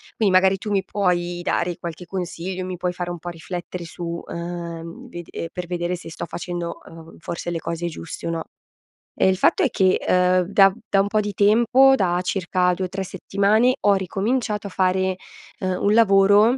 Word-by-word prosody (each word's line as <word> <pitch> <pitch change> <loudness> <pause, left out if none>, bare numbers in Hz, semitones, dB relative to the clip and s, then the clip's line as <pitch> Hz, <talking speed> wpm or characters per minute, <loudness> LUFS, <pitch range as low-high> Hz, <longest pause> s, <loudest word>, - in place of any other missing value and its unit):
Quindi 205 -4 +2
magari 190 +1 +5
tu 210 +2 -5
mi 195 -1 +1
puoi 175 -3 -1
dare 175 0 -1
qualche 170 +1 -7
consiglio, 185 0 -4
mi 185 -1 -5
puoi 180 +1 -1
fare 175 0 -4
un 175 - -6
po' 175 - -6
riflettere 175 +1 -6
su 170 +2 -9 0.2
uhm, 170 +5 -6
vede 175 -3 -7
per 180 - -4
vedere 175 0 -2
se 175 - -10
sto 165 - -6
facendo, 175 0 -5
uhm, 165 0 -13
forse 170 +1 -5
le 170 - -2
cose 170 +1 -3
giuste 165 0 -7
o - - -1
no. 165 -1 -2 0.8
Ehm, - - +5
il 190 - +1
fatto - - +3
è - - +3
che, 185 -1 +3
ehm, 180 0 +3
da 195 -1 +6 0.2
da 195 - +3
un 195 - 0
po' 215 +1 +1
di 205 0 -4
tempo, 240 +7 +5
da 180 -5 +1
circa 180 -1 +1
2-3 190 +1 -3
settimane, 205 +6 +2
ho 205 - +4
ricominciato 210 +3 -1
a - - -7
fare, 185 0 +1 0.5
uhm, 185 -1 -1
un 205 - +3
lavoro, 205 +2 +5
185 Hz, 190 wpm, -22 LUFS, 175-200 Hz, 0.8 s, da